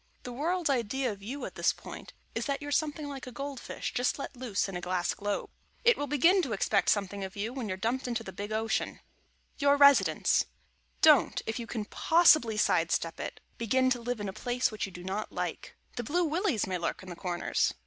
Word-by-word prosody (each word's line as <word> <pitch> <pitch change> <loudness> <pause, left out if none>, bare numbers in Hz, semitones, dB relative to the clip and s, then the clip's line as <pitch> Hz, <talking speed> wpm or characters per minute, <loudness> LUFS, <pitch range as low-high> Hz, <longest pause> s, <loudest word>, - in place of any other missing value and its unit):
The 245 - -6
World's 325 +4 0
idea 255 0 0
of 200 -1 -9
you 260 +8 -5
at - - -7
this - - +2
point - - -10 0.2
is, - - -2
that 280 -1 -1
you're 290 0 -6
something 300 0 0
like 275 -2 -7
a - - -6
gold 275 +2 -5
fish - - -5
just 245 +1 +1
let 280 - -6
loose 240 -6 -1
in 195 - -6
a 180 - -3
glass 180 -1 0
globe. 205 0 -3 0.3
It 475 0 +6
will 290 - -3
begin 330 +7 +4
to 260 -10 -2
expect 200 0 +2
something 200 -1 0
of 190 +2 -6
you 215 +4 -3
when 255 -4 -4
you're 185 -2 -3
dumped 240 +6 -1
into 235 -2 -2
the 190 - -8
big 205 +3 -6
Ocean. 220 +1 0
[Sidenote: - - -22 0.6
YOUR 285 0 +4
RESIDENCE] 280 -1 +5 0.6
Don't, 305 -3 +6
if 220 +2 -3
you 235 - -6
can 220 -3 -3
possibly 310 -5 +4
side 170 -5 +2
step 165 0 -1
it, - - -6 0.2
begin 260 +3 +2
to 245 -2 +1
live 245 0 -3
in 205 - -3
a 190 - -4
place 245 +4 0
which 215 -2 -3
you - - -11
do 175 0 -10
not 195 +3 -3
like. - - -4 0.2
The 240 - -2
Blue 345 +9 +1
Willies 320 - 0
may 185 -1 -2
lurk 170 +2 -3
in 185 - -10
the 175 - -6
corners. 175 0 -1
240 Hz, 230 wpm, -30 LUFS, 200-280 Hz, 0.6 s, It